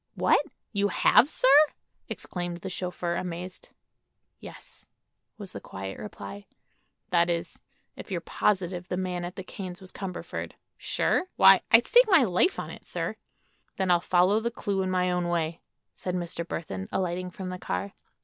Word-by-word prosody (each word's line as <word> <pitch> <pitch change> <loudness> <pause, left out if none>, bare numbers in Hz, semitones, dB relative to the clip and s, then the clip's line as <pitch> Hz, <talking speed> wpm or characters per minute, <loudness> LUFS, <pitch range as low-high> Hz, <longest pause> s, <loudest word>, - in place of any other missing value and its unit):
"What! - - +3 0.3
you 200 0 +2
have, 245 +5 +5
sir?" 255 - +3 0.6
exclaimed 175 -1 -5
the 190 - -5
chauffeur, 180 -1 -3
amazed. 180 +1 -6 0.7
"Yes," - - -12 0.5
was 200 -3 -8
the - - -8
quiet 95 0 -7
reply. 205 -1 -8 0.6
"That 170 -1 +3
is, 170 -1 -3 0.4
if - - -10
you're 185 -3 -1
positive 180 -1 -1
the 180 - -2
man 180 -1 -2
at 175 +1 -6
the 190 - -6
Kanes 185 -1 -7
was 190 -1 -11
Cumberford." 190 -2 -6 0.2
"Sure? - - 0
Why, - - +8
I'd - - +7
stake - - +6
my 365 -9 +6
life 210 - +2
on - - -5
it, - - -12
sir." - - -1 0.6
"Then 190 -1 +1
I'll 175 -1 +4
follow 185 +4 +3
the 235 +1 -1
clue 200 -4 -2
in 185 - -1
my 180 -1 +1
own 180 -1 0
way," 170 -1 -1 0.3
said 180 -1 -4
Mr. 175 -1 -2
Burthon, 95 - -5
alighting 180 0 -2
from 185 +1 -7
the 185 0 -6
car. 95 - -3
180 Hz, 165 wpm, -27 LUFS, 175-195 Hz, 0.7 s, Why